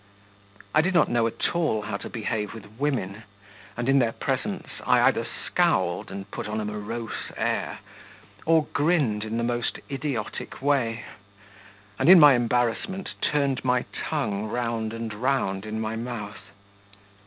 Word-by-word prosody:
I 155 Hz, -, +6 dB
did 185 Hz, +3 st, 0 dB
not 170 Hz, -, +5 dB
know 120 Hz, -1 st, +2 dB
at 115 Hz, -, -1 dB
all 155 Hz, -11 st, +1 dB
how 105 Hz, -, -3 dB
to -, -, -7 dB
behave 110 Hz, -2 st, -3 dB
with 110 Hz, +1 st, -12 dB
women, 115 Hz, -8 st, -1 dB, 0.6 s
and 120 Hz, +1 st, -2 dB
in 135 Hz, 0 st, +5 dB
their 115 Hz, -3 st, +2 dB
presence -, -, -2 dB, 0.2 s
I -, -, +4 dB
either -, -, +3 dB, 0.2 s
scowled -, -, +1 dB
and 95 Hz, 0 st, -7 dB
put -, -, -5 dB
on 105 Hz, +1 st, -2 dB
a 105 Hz, -, -2 dB
morose 105 Hz, +2 st, -5 dB
air, -, -, -1 dB, 0.7 s
or 165 Hz, -1 st, +5 dB
grinned 145 Hz, -9 st, +2 dB
in 110 Hz, +1 st, -3 dB
the 115 Hz, -, 0 dB
most 120 Hz, 0 st, -1 dB
idiotic 135 Hz, -6 st, -4 dB
way, 130 Hz, -5 st, +1 dB, 1.0 s
and -, -, +4 dB
in 185 Hz, -1 st, +11 dB
my 145 Hz, -3 st, +9 dB
embarrassment 120 Hz, -, 0 dB
turned 140 Hz, -3 st, +1 dB
my 125 Hz, -1 st, +2 dB
tongue 110 Hz, -9 st, -2 dB
round 115 Hz, -1 st, -2 dB
and 115 Hz, -1 st, -4 dB
round 110 Hz, -4 st, 0 dB
in 110 Hz, +1 st, -3 dB
my 110 Hz, 0 st, -2 dB
mouth. 115 Hz, -4 st, -6 dB
115 Hz, 155 wpm, -26 LUFS, 110-135 Hz, 1.0 s, in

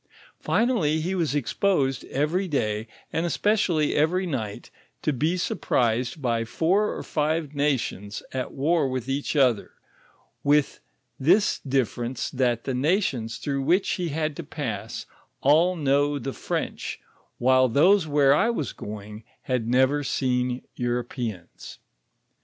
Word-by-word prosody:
Finally 210 Hz, -11 st, +1 dB
he 175 Hz, +4 st, -2 dB
wos 165 Hz, -6 st, 0 dB
exposed 140 Hz, -2 st, 0 dB
every 160 Hz, +7 st, 0 dB
doy, 110 Hz, -8 st, -1 dB, 0.3 s
and 160 Hz, -, 0 dB
especially 175 Hz, -4 st, +1 dB
every 175 Hz, +5 st, +2 dB
night, 115 Hz, -, -4 dB, 0.3 s
to 150 Hz, -, +1 dB
be 155 Hz, +7 st, 0 dB
surprised 125 Hz, -5 st, 0 dB
by 120 Hz, -4 st, 0 dB
four 180 Hz, -, +1 dB
or -, -, -5 dB
five 155 Hz, -1 st, -1 dB
nations 130 Hz, -8 st, -1 dB
at 130 Hz, -1 st, -3 dB
war 145 Hz, +1 st, +1 dB
with 130 Hz, -1 st, -3 dB
each 140 Hz, +3 st, -2 dB
other, 125 Hz, -7 st, +2 dB, 0.7 s
with 145 Hz, 0 st, +2 dB, 0.4 s
this 185 Hz, +10 st, +3 dB
difference 130 Hz, -2 st, -2 dB
that 125 Hz, -3 st, 0 dB
the 135 Hz, -, -2 dB
notions 130 Hz, -, 0 dB
through 140 Hz, -2 st, -2 dB
which 175 Hz, +8 st, +2 dB
he 175 Hz, -2 st, -1 dB
had 155 Hz, 0 st, -2 dB
to 170 Hz, -, -6 dB
pass 130 Hz, -9 st, -5 dB, 0.4 s
all 165 Hz, +6 st, +4 dB
know 145 Hz, -1 st, +2 dB
tho 135 Hz, 0 st, -4 dB
French, -, -, -4 dB, 0.4 s
while 130 Hz, +1 st, +4 dB
those 170 Hz, -, +4 dB
where 145 Hz, -2 st, +4 dB
I 220 Hz, +10 st, +3 dB
was 155 Hz, -, -2 dB
going 105 Hz, +1 st, -8 dB, 0.2 s
had 125 Hz, -3 st, -1 dB
never 130 Hz, +4 st, +3 dB
seen 125 Hz, -2 st, 0 dB
Europeans. 120 Hz, -6 st, -4 dB
140 Hz, 130 wpm, -25 LUFS, 125-160 Hz, 0.7 s, all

